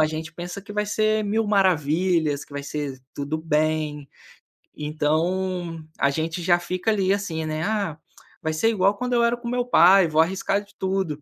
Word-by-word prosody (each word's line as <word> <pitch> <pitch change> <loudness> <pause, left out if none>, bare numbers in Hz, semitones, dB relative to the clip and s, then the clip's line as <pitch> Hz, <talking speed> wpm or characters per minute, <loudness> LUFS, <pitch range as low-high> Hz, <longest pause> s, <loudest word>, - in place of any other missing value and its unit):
a 155 - +5
gente 155 0 -5
pensa 175 +3 -6
que 205 +1 -10
vai 210 0 0
ser 215 +1 +1
mil 215 +2 0
maravilhas, 170 -5 +2
que - - -19
vai 140 0 -5
ser 145 -3 -4 0.2
tudo 145 +2 -3
bem. 155 -2 -1 0.7
Então, 165 +3 -1
a 140 - +3
gente 160 +4 -2
já 175 0 +4
fica 185 +4 -2
ali, 195 -3 +1
assim, 175 -6 -1
né: 155 0 -3
"Ah, 200 -6 -1 0.4
vai 160 - -1
ser 190 +9 +2
igual 200 -2 +2
quando 250 +3 -3
eu 235 -1 +3
era 235 0 +3
com 240 0 -7
o - - -3
meu 245 0 0
pai. 190 -4 +6
Vou 155 0 +3
arriscar 190 +3 0
de 205 - -22
tudo." 190 -6 -2
175 Hz, 195 wpm, -24 LUFS, 155-200 Hz, 0.7 s, pai